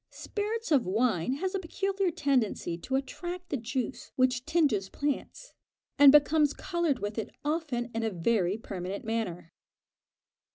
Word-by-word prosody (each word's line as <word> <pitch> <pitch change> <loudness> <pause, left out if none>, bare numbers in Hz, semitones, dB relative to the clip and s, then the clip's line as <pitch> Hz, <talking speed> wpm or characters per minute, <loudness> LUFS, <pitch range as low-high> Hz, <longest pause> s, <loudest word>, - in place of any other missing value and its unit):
Spirits 430 -1 -4
of 270 -9 +4
wine 215 0 +1
has 370 +7 -2
a 390 - 0
peculiar 390 +2 -1
tendency 260 - 0
to 220 +10 -3
attract 350 +6 -4
the - - -1
juice 250 +2 -4
which 255 0 +1
tinges 280 - +2
plants, 290 - -4 0.5
and 285 -1 +10
becomes 295 0 +4
coloured 345 -6 0
with 205 +1 -3
it 220 - -4 0.2
often 295 -6 -1
in 225 - -1
a 225 - 0
very 190 +1 +1
permanent 195 0 -6
manner. 200 -7 -3
265 Hz, 140 wpm, -29 LUFS, 220-320 Hz, 0.5 s, and